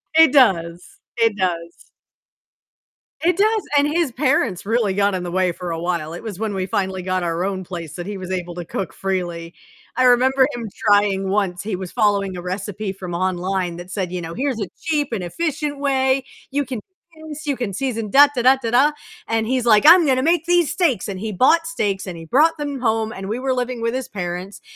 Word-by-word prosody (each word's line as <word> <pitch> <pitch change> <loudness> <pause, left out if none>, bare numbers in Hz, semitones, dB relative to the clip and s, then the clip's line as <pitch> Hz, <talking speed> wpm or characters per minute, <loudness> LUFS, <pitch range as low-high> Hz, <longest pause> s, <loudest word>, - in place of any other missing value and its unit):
It 320 -3 +7
does, 175 - +2 0.2
it 225 -2 +3
does. 170 -3 -3 1.4
It 350 +1 +2
does, 435 +2 +3 0.2
and 285 0 +4
his 320 -2 0
parents 255 - 0
really 220 -2 +1
got 200 0 +1
in 180 - -3
the 175 - -5
way 185 0 +1
for 175 0 -6
a 165 - -3
while, 170 -2 -2
it 175 - -7
was 210 -5 -6
when 220 -2 -2
we 190 -1 -2
finally 190 0 -2
got 185 0 -1
our 170 +1 -1
own 190 -1 -3
place 170 -4 -7
that 175 +2 -6
he 205 0 -5
was 185 -1 -7
able 175 -2 -4
to 175 - -6
cook 190 +3 -4
freely. 175 -3 -3 0.4
I 255 - +2
remember 260 +2 +5
him 235 -2 -5 0.2
trying 205 -2 +3
once, 195 -2 -1
he 210 -2 -3
was 185 -2 -7
following 200 -3 +1
a 175 - -6
recipe 195 +2 -4
from 185 -2 -7
online 185 0 -1
that 175 +2 -9
said, 185 -4 -3
you 180 -1 -3
know, 165 0 -6
"Here's 260 +2 -2
a 205 - -2
cheap 300 -3 0
and 195 - -2
efficient 295 - -3
way. 265 -1 +1 0.3
You 285 +1 0
can 250 -2 -5
do 335 - -19
this, 305 +1 -8
you 285 -2 0
can 240 -6 -4
season, 230 -2 -3
da, 285 +7 +8
da, 245 - 0
da, 260 +2 +6
da, 230 -2 -2
da," 270 +5 +5 0.4
and 225 -1 0
he's 250 +1 -1
like, 215 -2 +5
"I'm 335 +1 +8
gonna 260 -1 +2
make 330 +1 +2
these 350 -3 +3
steaks!" 315 - +1
And 195 -2 -5
he 220 +2 -4
bought 325 - +3
steaks, 205 -13 -2
and 175 -2 -6
he 165 - -9
brought 310 - +3
them 290 -2 -4
home, 220 -2 0
and 195 0 -7
we 220 - -2
were 265 0 0
living 250 -1 -3
with 230 0 0
his 260 -1 -3
parents, 180 0 -5
210 Hz, 220 wpm, -21 LUFS, 185-265 Hz, 1.4 s, da